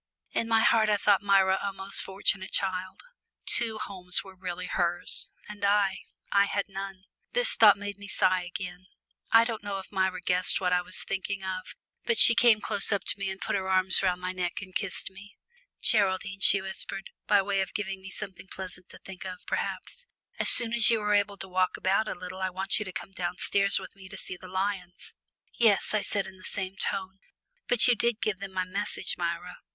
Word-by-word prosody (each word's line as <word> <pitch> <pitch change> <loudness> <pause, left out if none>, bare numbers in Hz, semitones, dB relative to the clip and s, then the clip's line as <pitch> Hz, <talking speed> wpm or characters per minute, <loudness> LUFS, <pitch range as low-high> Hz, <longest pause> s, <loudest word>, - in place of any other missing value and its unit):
In 230 - -2
my 225 -1 +2
heart 220 -1 +3
I 210 - +2
thought 200 -1 +2
Myra 195 -1 +2
a 200 - -3
most 195 0 +3
fortunate 190 0 0
child 185 -1 -3 0.4
two 225 -2 +1
homes 185 -3 -2
were 195 - -13
really 180 -1 -6
hers; 175 -1 -2 0.2
and 210 -1 -10
I 200 -1 +1 0.3
I 200 0 +4
had 200 0 -2
none. 195 -1 -8 0.3
This - - +7
thought 210 -3 +6
made 205 0 -7
me 205 - -10
sigh 185 -2 +1
again. 180 0 -8 0.4
I 230 0 +6
don't 230 -2 -4
know 200 -1 -4
if 190 - -10
Myra 190 -3 -1
guessed 180 0 +3
what 180 -1 0
I 180 - +2
was 185 +1 -2
thinking 195 0 -5
of, 185 0 -6 0.3
but 470 -1 0
she 230 - +10
came 230 -2 +4
close 200 - +1
up 200 - 0
to - - 0
me 195 -1 -3
and 190 0 -7
put - - -3
her 190 -1 -3
arms 185 0 +7
round 180 -2 0
my 185 0 -3
neck 180 -1 -3
and 190 -1 -11
kissed 195 -2 -4
me. 195 +2 -15 0.5
"Geraldine," 190 -2 +1
she 200 0 +6
whispered, 190 0 -2 0.2
by 205 -2 +3
way 195 0 -1
of 190 - -6
giving 195 -2 -4
me 190 - -10
something 195 -2 -8
pleasant 185 -1 -8
to - - -11
think 190 -1 -11
of, 185 -1 -7
perhaps, - - -5 0.3
"as - - +7
soon 235 -1 +7
as 235 -1 +4
you 230 -1 +2
are 210 0 0
able 205 0 0
to 190 +1 -8
walk 185 0 -1
about 200 +3 0
a - - -4
little 185 +1 -9
I 190 - -1
want 190 +2 -1
you 210 - -4
to 190 - -7
come 195 - -8
downstairs 190 +2 0
with 190 0 -8
me 190 -1 -14
to 195 - -10
see 180 - -7
the 185 +1 -13
lions." 185 -1 -5 0.4
"Yes," 220 -4 +2
I 215 - +1
said 200 -1 -2
in 190 0 -12
the 185 - -18
same 190 -1 -5
tone, 190 0 -4 0.5
"but 245 0 +4
you 245 - +5
did 235 -1 -1
give 210 -4 -2
them 195 -1 -8
my 185 -1 -2
message, 195 0 -3
Myra?" 175 +1 -5
195 Hz, 215 wpm, -27 LUFS, 185-205 Hz, 0.5 s, she